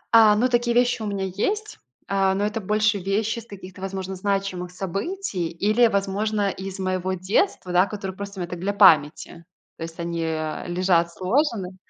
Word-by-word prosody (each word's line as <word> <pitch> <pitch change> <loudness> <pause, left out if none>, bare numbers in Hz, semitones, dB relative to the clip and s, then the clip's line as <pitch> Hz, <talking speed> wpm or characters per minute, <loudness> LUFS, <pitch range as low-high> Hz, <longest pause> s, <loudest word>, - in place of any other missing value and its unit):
А, 215 -2 +7
ну, 235 +4 +3
такие 240 -1 +1
вещи 245 -1 +2
у 215 - -3
меня 200 -1 -2
есть, 410 - -2 0.3
а, 195 -1 +2
но 205 +1 0
это 215 +1 -2
больше 210 +1 +1
вещи 210 +4 -1
с 230 - -13
каких-то, 190 -1 -11
возможно, 190 0 -4
значимых 195 -2 -2
событий 195 - -3
или, 215 +8 +3
возможно, 200 0 0
из 190 0 -7
моего 185 -1 -1
детства, 185 - 0
да, 180 +3 +4
которые 195 -2 -6
просто 200 0 -7
мне 175 - -3
так 175 0 -6
для 200 +3 -1
памяти. 170 -3 +4 0.3
То - - -15
есть 165 +1 -7
они, 170 0 -3
э, 155 -1 -3
лежат 175 -1 +2
сложены. 190 - -1
195 Hz, 175 wpm, -24 LUFS, 180-210 Hz, 0.3 s, А